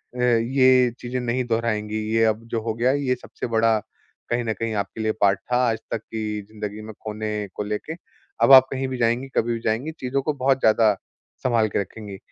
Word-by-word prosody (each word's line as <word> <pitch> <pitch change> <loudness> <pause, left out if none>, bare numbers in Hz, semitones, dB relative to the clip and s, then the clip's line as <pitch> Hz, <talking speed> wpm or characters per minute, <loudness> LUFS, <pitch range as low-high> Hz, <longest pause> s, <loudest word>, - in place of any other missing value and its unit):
अ, 125 - -6
ये 125 +1 +4
चीज़ें 125 +1 -3
नहीं 125 +1 -1
दोहराएँगी, 110 -2 -1 0.2
ये 115 0 +3
अब 110 +1 0
जो 115 - 0
हो 110 0 -2
गया 120 +3 +1
है, 145 +1 0
ये 125 -1 +1
सबसे 125 - -7
बड़ा 115 -1 +2 0.5
कहीं 120 0 0
न 110 - -1
कहीं 115 0 -3
आपके 105 +3 -7
लिए 110 0 +1
पार्ट 100 0 +4
था 125 - +3
आज 110 - 0
तक - - 0
की 110 -1 -4
जिंदगी 105 0 -6
में 110 0 -9
खोने 105 -1 -3
को - - -3
लेके। 105 +9 -4 0.5
अब 115 - +5
आप 130 0 +9
कहीं 135 0 -2
भी 130 -1 -4
जाएँगी, 120 +3 +1
कभी 120 +1 +1
भी 115 - -3
जाएँगी, 115 +8 0
चीज़ों 135 +2 -1
को 150 +2 -1
बहुत 135 -1 +1
ज़्यादा 110 -2 +4 0.5
सँभाल 115 -3 +2
के - - -1
रखेंगी। 100 0 -8
115 Hz, 215 wpm, -23 LUFS, 110-125 Hz, 0.5 s, आप